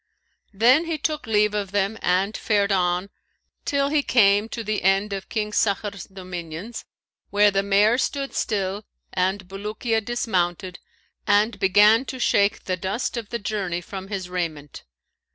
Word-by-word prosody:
Then 245 - +4
he 330 -1 -2
took 300 -3 -3
leave 210 -1 +2
of 205 -2 -2
them 200 +1 0
and 190 +4 +1
fared 205 -2 +1
on, 180 0 0 0.5
till 280 -1 +1
he 300 0 +2
came 210 -4 +3
to 230 - -5
the 215 -1 -2
end 195 +2 +2
of 195 -1 -6
King 210 -1 -2
Sakhr's 200 -2 -1
dominions, 185 +2 -7 0.4
where 205 0 +4
the 195 0 +1
mare 205 +4 +3
stood 275 0 -2
still 200 -1 -2 0.3
and 190 +1 -1
Bulukiya 215 +3 -2
dismounted 185 -6 -2 0.5
and 205 +1 +3
began 210 +5 +5
to 260 - -6
shake 200 -4 +2
the 185 -1 -2
dust 190 +9 -3
of 230 -3 -5
the 235 - -2
journey 200 -5 -3
from 190 +2 -8
his 195 -3 -4
raiment. 165 -6 -5
205 Hz, 150 wpm, -23 LUFS, 190-220 Hz, 0.5 s, began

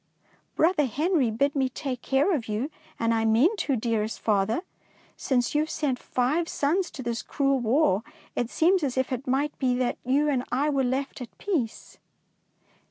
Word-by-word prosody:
Brother 320 -2 +3
Henry 300 - +1
bid 280 +7 0
me 265 -2 +1
take 255 -1 -4
care 275 +10 +2
of 255 -8 -2
you, 225 +8 -2 0.3
and 230 0 +2
I 225 -1 +1
mean 235 - +4
to, 280 -8 0
dearest 220 -2 -1
father. 215 - +1 0.5
Since 245 -3 0
you 300 - +3
have 310 - -2
sent 270 -5 -1
five 295 +7 0
sons 345 +6 0
to 265 - -6
this 235 -1 -2
cruel 275 -2 0
war, 235 -4 +2 0.3
it 240 -1 -1
seems 360 +6 +3
as 265 -4 -2
if 260 0 0
it 255 +1 -3
might 280 +3 0
be 255 -2 +2
that 250 -1 -1
you 275 +4 +2
and 265 -4 +1
I 285 +4 +1
were 275 -2 +1
left 265 +2 -2
at 245 - -9
peace. 300 - -3
265 Hz, 180 wpm, -26 LUFS, 240-295 Hz, 0.5 s, mean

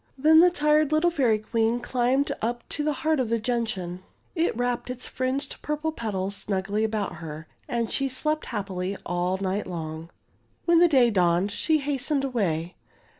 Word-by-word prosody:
Then 310 +4 +6
the 355 +2 +7
tired 300 -3 +2
little 315 +3 +3
Fairy 255 -9 +2
Queen 225 +2 0
climbed 255 +3 +1
up 240 +2 -2
to 295 - -1
the 305 - +1
heart 315 -2 +3
of 250 -4 0
the 230 - +2
gentian. 215 -7 -2 0.3
It 330 -8 0
wrapped 245 0 -1
its 250 0 -4
fringed 265 +2 -3
purple 300 +1 -2
petals 200 -7 -3
snugly 200 +2 -2
about 210 -5 -2
her, 155 -1 -7 0.2
and 235 -1 -1
she 275 -1 0
slept 305 +4 -1
happily 195 -3 -3
all 175 +2 0
night 195 +1 -2
long. 160 -2 -6 0.6
When 340 -1 +5
the 350 - +7
day 255 -7 +4
dawned 180 0 +2
she 315 +9 +2
hastened 280 0 -1
away. 180 -10 -1
235 Hz, 170 wpm, -26 LUFS, 190-290 Hz, 0.6 s, the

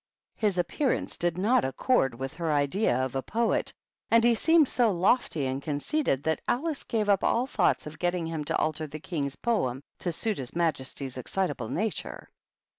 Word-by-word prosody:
His 205 -4 +1
appearance 255 - 0
did 175 0 -1
not 215 +7 +3
accord 135 - +1
with 135 +4 -5
her 165 -2 -1
idea 145 - +2
of 130 - -6
a 135 - -1
poet, 225 - 0 0.4
and 230 0 +5
he 240 0 +5
seemed 320 +5 +4
so 240 -3 +2
lofty 180 - +1
and 130 +1 -2
con 145 0 -2
ceited 145 - 0
that 160 0 0
Alice 300 +3 0
gave 215 -2 -1
up 200 -2 +3
all 240 +2 +2
thoughts 175 - +1
of 150 +1 -9
getting 175 -1 0
him 160 -2 -3
to - - 0
alter 155 0 -1
the 150 - -7
King's 145 -4 -3
poem 135 - -1 0.2
to 175 - -2
suit 215 +3 -2
his 125 -3 -7
majesty's 135 -5 -2
excitable 145 -5 -2
nature. 215 +4 -3
170 Hz, 185 wpm, -28 LUFS, 140-220 Hz, 0.4 s, and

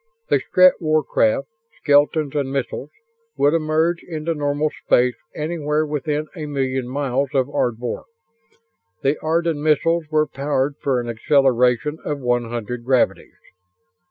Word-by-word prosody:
The 145 - +4
Strett 185 +7 +4
warcraft, 155 -6 +1 0.3
skeletons 145 0 +2
and 140 -2 -1
missiles, 135 +1 -3 0.5
would 145 +2 +3
emerge 160 +1 +1
into 165 -1 -3
normal 145 0 -1
space 125 0 +3 0.2
anywhere 155 -1 -1
within 150 0 -2
a 155 -3 -5
million 130 -3 -2
miles 135 0 -1
of 130 -1 +3
Ardvor. 120 -4 -2 1.0
The 140 +2 +2
Ardan 165 -1 0
missiles 160 +2 +2
were 155 -1 +2
powered 140 0 -1
for 135 -3 +1
an 120 - -5
acceleration 125 +3 +2
of 150 - -2
one 120 -2 0
hundred 120 +1 -5
gravities. 130 0 0
145 Hz, 130 wpm, -21 LUFS, 130-155 Hz, 1.0 s, The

